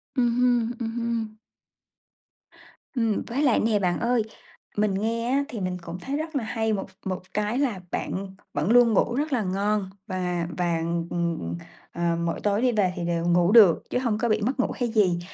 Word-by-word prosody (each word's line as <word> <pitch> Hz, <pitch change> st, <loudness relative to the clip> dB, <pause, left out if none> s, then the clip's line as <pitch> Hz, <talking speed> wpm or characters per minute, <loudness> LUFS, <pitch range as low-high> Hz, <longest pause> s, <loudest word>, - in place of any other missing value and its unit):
Ừm 245 Hz, -2 st, +3 dB
hưm, 245 Hz, -2 st, +2 dB
ừm 230 Hz, -2 st, -2 dB
hưm. 230 Hz, -2 st, -2 dB, 1.6 s
Ừm, 225 Hz, -3 st, +1 dB
với 245 Hz, +4 st, -1 dB
lại 260 Hz, -6 st, +4 dB
nè 215 Hz, -2 st, +2 dB
bạn 180 Hz, -3 st, 0 dB
ơi, 240 Hz, 0 st, +2 dB, 0.6 s
mình 210 Hz, -1 st, +2 dB
nghe 230 Hz, +4 st, -1 dB
á, 280 Hz, +1 st, +2 dB
thì 230 Hz, -, -5 dB
mình 185 Hz, -1 st, -2 dB
cũng 170 Hz, +1 st, -7 dB
thấy 275 Hz, +7 st, -3 dB
rất 315 Hz, 0 st, -5 dB
là 265 Hz, -, 0 dB
hay 220 Hz, 0 st, -1 dB
một 195 Hz, -1 st, -3 dB, 0.2 s
một 185 Hz, -1 st, -2 dB
cái 210 Hz, +4 st, 0 dB
là 245 Hz, -9 st, 0 dB
bạn 190 Hz, 0 st, -4 dB, 0.2 s
vẫn 150 Hz, +9 st, 0 dB
luôn 240 Hz, -2 st, +6 dB
ngủ 235 Hz, +3 st, +2 dB
rất 295 Hz, +1 st, -1 dB
là 235 Hz, -, +1 dB
ngon, 200 Hz, +1 st, 0 dB, 0.2 s
và 180 Hz, -3 st, -2 dB
và, 175 Hz, -2 st, +1 dB, 0.3 s
ừm, 170 Hz, -1 st, -1 dB
ừm, 85 Hz, +1 st, -4 dB, 0.4 s
ờ, 170 Hz, 0 st, 0 dB
mỗi 165 Hz, -, -1 dB
tối 205 Hz, +2 st, +1 dB
đi 255 Hz, -1 st, +3 dB
về 195 Hz, -5 st, +1 dB
thì 175 Hz, -, -3 dB
đều 170 Hz, -1 st, -1 dB
ngủ 175 Hz, +1 st, +4 dB
được 210 Hz, -7 st, +7 dB
chứ -, -, 0 dB
hông 235 Hz, -5 st, 0 dB
có 235 Hz, +2 st, 0 dB
bị 215 Hz, -, +2 dB
mất 255 Hz, +5 st, -1 dB
ngủ -, -, +1 dB
hay 245 Hz, -2 st, -1 dB
gì. 195 Hz, -6 st, +2 dB
215 Hz, 205 wpm, -25 LUFS, 185-235 Hz, 1.6 s, được